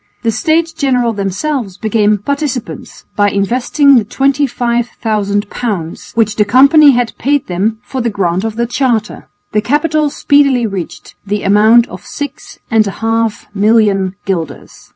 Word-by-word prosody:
The 230 - +1
States 320 +9 0
General 255 -7 0
themselves 200 +2 -3
became 215 -1 +1
"participants" 275 +2 -5
by 205 0 +3
investing 245 +8 +2
the 230 - +2
25,000 235 -5 -1
pounds, 195 -9 -5
which 215 -2 +1
the 210 - +4
company 280 +7 +6
had 245 -2 -1
paid 285 +1 0
them 200 +5 -1
for 260 - -4
the 235 - 0
grant 185 -3 -1
of 225 -1 -3
the 235 +1 0
charter. 240 -3 -2 0.2
The 210 - +1
capital 300 +4 0
speedily 280 -4 +2
reached 195 -5 -6
the 205 +1 -3
amount 220 +4 +4
of - - -10
six 290 -1 -8
and 220 -2 +3
a 200 +3 -6
half 225 -1 -1
million 205 -3 +2
guilders. 180 -4 -5
225 Hz, 145 wpm, -13 LUFS, 205-270 Hz, 0.2 s, company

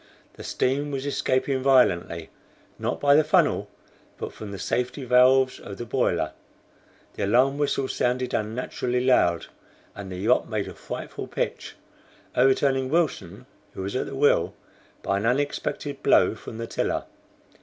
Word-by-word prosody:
The - - -11
steam 140 +3 0
was 135 -1 -4
escaping 135 -1 0
violently, 90 -11 +2 0.5
not - - -2
by 140 0 +4
the 155 +2 +6
funnel, 155 - +2 0.5
but - - -6
from 105 -2 -8
the 100 - -6
safety 125 +7 -2
valves 130 +1 +4
of 100 - -9
the 120 - -5
boiler; 110 - 0 0.8
the - - -2
alarm 130 +6 +3
whistle 140 -2 0
sounded 125 0 -1
unnaturally 125 +3 -2
loud, 90 -10 +3 0.5
and 95 -1 -8
the 90 - -5
yacht 110 +7 +2
made 110 -3 -2
a - - -7
frightful - - -7
pitch, - - -4 0.6
overturning 135 0 +3
Wilson, 150 - -1 0.3
who 95 - -5
was 100 +4 -4
at - - -1
the - - -6
wheel, 145 +2 +2 0.5
by 100 - 0
an 105 +3 -1
unexpected 140 +1 -2
blow - - +4
from 110 - -9
the 115 - -4
tiller. - - -2
125 Hz, 150 wpm, -25 LUFS, 110-135 Hz, 0.8 s, the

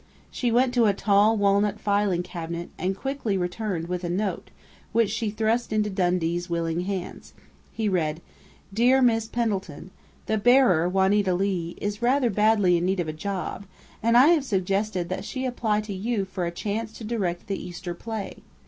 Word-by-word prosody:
She 245 -2 -1
went 245 +2 +3
to 240 -3 +4
a 200 - +2
tall 205 +2 +3
walnut 200 +1 +2
filing 200 -3 +1
cabinet, 170 -1 -6
and 190 +1 -1
quickly 270 -5 -2
returned 180 -1 -3
with 180 0 -3
a 175 - -2
note, 195 +3 -2 0.4
which 225 -2 +2
she 220 0 -1
thrust 220 +3 0
into 210 -1 0
Dundee's 175 -2 0
willing 165 0 -1
hands. 190 -2 -5 0.4
He 220 -1 -2
read: 160 -5 0 0.5
_"Dear 250 +5 +4
Miss 225 -2 +2
Pendleton: 200 -7 -3 0.3
The 220 0 0
bearer, 220 -8 +4
Juanita 190 0 +2
Leigh, 180 -3 -1
is 205 +2 -3
rather 250 0 +2
badly 210 -3 +3
in 170 - -1
need 190 0 0
of 165 -3 -1
a - - -3
job, 195 +3 -4 0.3
and 230 +2 +4
I 265 +5 +7
have 330 -5 +4
suggested 195 -4 -1
that 185 - -3
she 260 -1 -4
apply 225 -4 0
to 210 -1 -6
you 205 +1 -1
for 185 -2 -3
a - - -3
chance 215 +5 -3
to 225 - -10
direct 200 -6 -2
the 195 -1 -4
Easter 175 0 -6
play. 220 +3 -6
200 Hz, 175 wpm, -25 LUFS, 180-225 Hz, 0.5 s, I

